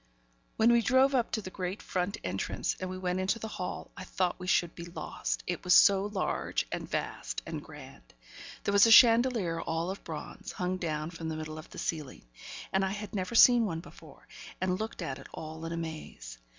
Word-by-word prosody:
When 230 +2 +5
we 235 - +5
drove 260 +4 +4
up 245 -3 +2
to 220 - -1
the 185 - -7
great 185 +1 -4
front 185 +3 -2
entrance, - - -2
and 185 - -4
went 180 0 0
into 190 +4 +1
the 225 - -6
hall, 185 -4 -5
I 185 - -7
thought 185 0 -1
we 180 0 -4
would 175 - -10
be 170 - -8
lost 170 -2 -4
it 175 -2 -3
was 180 - +5
so 195 -1 +6
large, 205 -2 -1
and - - -4
vast - - -3
and - - -5
grand. - - -13 0.5
There - - 0
was 200 +2 +6
a - - +4
chandelier 225 -7 +6
all 165 +3 -2
of 195 - -8
bronze, 155 -2 -7
hung 185 0 -2
down 155 -2 -3
from 165 -1 -5
the 160 - -3
middle 155 0 -6
of 155 - -12
the - - -12
ceiling; 150 -5 -4 0.5
and 190 0 +3
I 190 0 -1
had 210 -1 -7
never 195 +3 -3
seen 240 -1 +7
one 165 -4 -3
before, 170 - -15 0.3
and 185 0 0
looked 220 -4 -4
at 135 -5 -4
it - - -11
all 160 +1 -7
in 165 - -4
amaze. 155 - -6
185 Hz, 205 wpm, -30 LUFS, 165-210 Hz, 0.5 s, seen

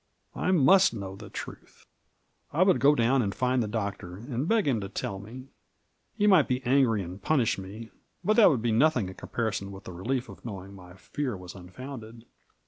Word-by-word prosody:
I - - -1
must 185 -2 +5
know 95 -2 -6
the - - -11
truth. - - -9 0.7
I 165 +5 +3
would 190 -2 +3
go 145 +2 +5
down 125 +1 +3
and 100 -4 -2
find 125 0 +1
the 110 - -1
Doctor, 100 -4 -4
and 125 +6 -4
beg 220 -3 +2
him 120 -6 +1
to 100 - -5
tell 100 -1 -4
me; 125 +6 -10 0.7
he 205 - +2
might 190 -8 +5
be 130 +1 -1
angry 125 -5 +3
and 90 +3 -9
punish 125 -5 +1
me 105 +4 -9 0.2
— - - -29
^but 215 +3 +3
that 220 - +8
would 130 -8 0
be 120 - +1
nothing 120 -4 +3
in - - -8
comparison 100 -2 -3
with 95 0 -10
the 90 - -9
relief 125 +8 -2
of - - -13
knowing 100 -4 -7
my 90 -2 -13
fear 125 +3 -4
was 90 -1 -10
unfounded. 115 +5 -10
115 Hz, 205 wpm, -28 LUFS, 100-135 Hz, 0.7 s, that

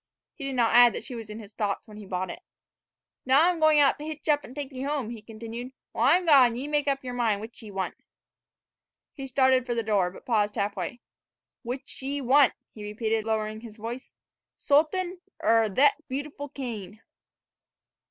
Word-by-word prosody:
He 280 - -8
did 270 -1 -3
not 235 -2 +2
add 240 -1 +8
that - - -5
she - - -7
was 225 -3 -7
in 210 - -7
his 215 -2 -11
thoughts 205 -2 -2
when 210 -1 -12
he 210 -2 -10
bought 185 0 -3
it. - - -10 0.8
"Now 275 +6 +5
I'm 355 -2 +1
going 310 -1 +5
out 280 0 +4
to - - -7
hitch 310 0 -7
up 290 -1 +3
an' 255 - -11
take 290 -2 -5
ye 260 -1 -7
home," 275 -4 -2
he 230 -2 -8
continued. 230 +3 -8 0.2
"While 245 +5 +3
I'm 355 +2 +3
gone, 265 -7 +6
ye 260 +4 -4
make 295 -1 0
up 275 -1 0
yer 250 -1 -5
mind 230 -4 +1
which 225 +4 -9
ye 220 - -10
want 190 -2 -3 0.6
" - - -66
He 270 -2 -7
started 260 -1 +3
for 240 - -1
the 230 - 0
door, 205 -5 +2
but 180 - -14
paused 210 -3 +1
half 200 -1 -1
way. 195 +6 -5 0.3
" - - -66
which 250 +3 -6
ye 280 +2 -2
want," 270 +1 +5 0.2
he 210 - -9
repeated, 220 +1 -1
lowering 215 -1 -2
his 225 -2 -11
voice, 235 +4 -7 0.5
"Sultan 345 +5 +1 0.2
er 225 -5 +4
thet 275 +8 +5
beautiful 285 +2 -5
cane?" 225 -6 -7
245 Hz, 205 wpm, -27 LUFS, 215-280 Hz, 0.8 s, add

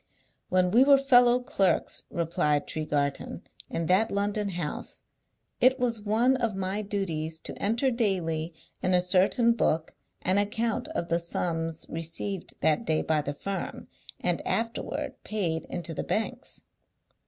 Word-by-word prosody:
"When 185 -1 +2
we 240 +5 +6
were 280 0 +7
fellow 250 -3 +5
clerks," 245 -8 +1
replied 155 -3 0
Tregarthen, 145 -2 -2 0.3
"in 165 - -2
that 190 +7 +3
London 205 +1 0
house, 170 -5 -4 0.6
it 260 +2 +5
was 235 -3 0
one 230 +5 +2
of 230 -5 -1
my 195 +2 -1
duties 165 -6 -2
to - - -7
enter 230 +6 +2
daily 175 -8 0 0.3
in 185 0 +2
a - - +6
certain 190 +7 +3
book 160 -8 0 0.3
an 190 +2 +3
account 220 +2 0
of 170 - -2
the 170 +1 +2
sums 165 -1 -2
received 165 +3 -3
that 155 +8 +3
day 160 -7 0
by 155 -1 +1
the 145 0 -4
firm, 195 +6 -5 0.3
and - - 0
afterward 230 0 -2
paid 175 -7 -1
into 170 -2 -5
the - - -3
bankers'. 220 - -2
190 Hz, 140 wpm, -28 LUFS, 165-225 Hz, 0.6 s, were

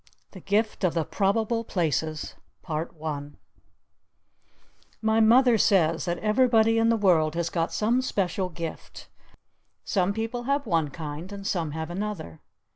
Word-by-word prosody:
THE 190 - -11
GIFT 210 +3 -1
OF 175 -2 +1
THE 165 -2 0
PROBABLE 225 +3 0
PLACES 160 -4 -2 2.7
My 220 0 +2
Mother 235 +1 +5
says 165 -6 +3
that 175 -1 -1
everybody 225 +1 +3
in 225 0 +3
the 230 - +3
world 165 -6 +3
has 170 0 -1
got 165 -1 -1
some 235 +4 +1
special 190 -6 -1
Gift. 165 -2 -8 0.7
Some 190 -1 +1
people 225 +3 -4
have 280 +2 0
one 165 -7 +1
kind 155 +4 -7
and 200 -1 -8
some 170 -5 -1
have 160 +1 -5
another. 185 - -5
195 Hz, 130 wpm, -26 LUFS, 165-225 Hz, 2.7 s, Mother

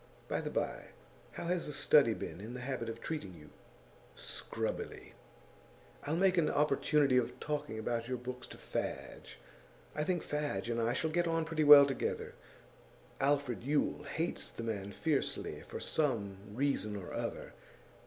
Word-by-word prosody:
By - - -1
the - - -3
bye, - - -2 0.5
how - - -5
has 175 0 0
The 150 - -4
Study 140 -5 +5
been 90 - -6
in 115 +4 -7
the 125 - -5
habit 125 -3 -3
of 115 0 -6
treating 105 - -4
you?' 75 -2 -14 0.6
'Scrubbily.' - - -5 0.9
'I'll 150 +2 0
make 185 0 +4
an 155 - +3
opportunity 145 -2 +3
of 125 - 0
talking 150 -7 -3
about 115 +1 -2
your 130 0 -1
books 125 0 -6
to - - -11
Fadge. - - -5 0.6
I 150 - -1
think 175 +1 0
Fadge 145 -8 -2
and 115 0 0
I 115 +1 +2
shall 160 +4 0
get 175 +1 +2
on 165 -1 +1
pretty 160 -1 0
well 145 -1 +11
together. 135 -1 -2 0.9
Alfred 140 -3 +1
Yule 145 +1 +1
hates 160 +4 -2
the 115 - -7
man 100 -3 -3
fiercely, 150 +6 -1
for - - -6
some 115 -11 0 0.2
reason 130 -6 0
or 95 -3 -6
other. - - -4
140 Hz, 160 wpm, -34 LUFS, 115-150 Hz, 0.9 s, well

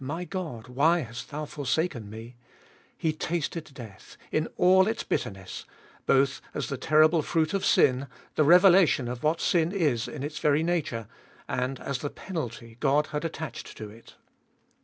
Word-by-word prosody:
My 165 +7 -4
God! 160 - -5
why 155 +7 +3
hast 120 -2 -8
thou 150 +1 -4
forsaken 145 - -2
Me? 115 +3 -10 0.6
He 160 -1 0
tasted 165 0 -3
death 115 -7 -12
in 155 +1 0
all 190 +1 +5
its 220 +1 -1
bitter - - -1
ness, 95 -2 -9 0.4
both 135 0 +3
as 150 - -3
the 140 - -2
terrible 155 +4 +4
fruit 160 +2 0
of 195 - 0
sin, 130 +1 +3 0.3
the 155 - +3
revelation 175 -4 +6
of 120 0 -5
what 155 +2 +1
sin 170 -1 +2
is 150 - 0
in 145 -3 -6
its 150 +1 -4
very 150 +1 +2
nature, 155 -10 -1 0.4
and 125 +1 -2
as 140 -2 -3
the 145 - -3
penalty 120 - -6
God 150 +2 +2
had 150 - -2
attached 160 -1 -6
to 105 -1 -7
it. 115 +2 -16
150 Hz, 165 wpm, -27 LUFS, 125-165 Hz, 0.6 s, revelation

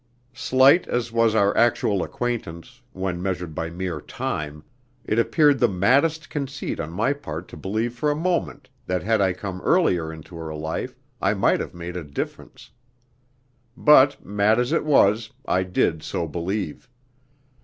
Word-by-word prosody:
Slight 130 +6 +4
as 120 -1 -2
was 115 -1 +2
our 100 -2 +3
actual 105 -4 +2
acquaintance, 120 0 -5
when 95 -2 -3
measured 90 -3 -3
by 80 +2 -3
mere 85 -2 -4
time, 75 0 -5 0.4
it 110 - +1
appeared 145 +3 +3
the 120 - +4
maddest 135 - +2
conceit 140 -2 -4
on 80 -2 -3
my 115 +10 +1
part 90 - -7
to - - -10
believe 110 +5 -2
for 135 +5 -1
a 145 - +1
moment 160 - -2 0.2
that 90 0 -1
had 110 +1 +2
I 95 -1 +3
come 95 0 -6
earlier 90 - +2
into 80 +2 -11
her 80 -1 -6
life 80 +1 -4 0.2
I - - +2
might - - +2
have - - -6
made 85 +1 -7
a 90 - -4
difference. 70 -1 -7 1.1
But, 140 -1 +5
mad 105 +3 +2
as 125 0 0
it - - +1
was, 110 -7 +3 0.2
I 95 - +1
did 90 -3 0
so 85 +1 -3
believe. 90 - -4
100 Hz, 160 wpm, -23 LUFS, 85-125 Hz, 1.1 s, But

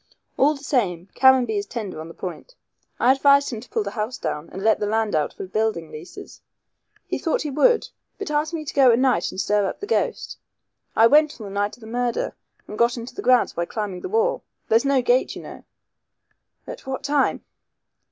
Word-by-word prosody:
All 295 +3 +3
the 280 - -13
same, 195 - -1
Caranby 255 -5 +4
is 200 - -6
tender 205 -9 -5
on 160 - -8
the 165 - -12
point. 190 - -8 0.4
I 250 - +5
advised 280 +1 +4
him 230 - -5
to 250 - -13
pull 450 - -1
the - - -5
house 220 +2 -3
down 150 +2 -4
and 190 - -7
let 220 0 +3
the 210 - -1
land 220 0 0
out 150 -2 +1
for - - -7
building 190 -5 -2
leases. 155 +4 -11 0.6
He - - -3
thought 325 - 0
he 300 - -3
would, 455 - +3 0.3
but 405 -7 -5
asked 300 +1 0
me 320 -2 -4
to - - -5
go 270 -3 +6
at 230 - +3
night 255 0 +2
and - - -7
stir 205 0 +1
up - - -5
the 410 - -5
ghost. 465 +3 -2 0.6
I 225 - +6
went 295 +4 +4
on 215 - -7
the 195 - -8
night 205 +1 -1
of - - -24
the - - -11
murder, 240 +1 -2 0.3
and 210 - -8
got 235 +1 +3
into 235 +2 -7
the 405 - -6
grounds 255 -8 +3
by 170 - -2
climbing 200 -2 -5
the - - -5
wall. 455 +4 +1 0.3
There's 225 +4 +3
no 275 -2 +2
gate, 250 +1 +2
you - - -8
know." - - -11 1.0
"At - - -9
what 265 -1 -4
time?" 285 -1 +1
240 Hz, 220 wpm, -23 LUFS, 205-280 Hz, 1.0 s, go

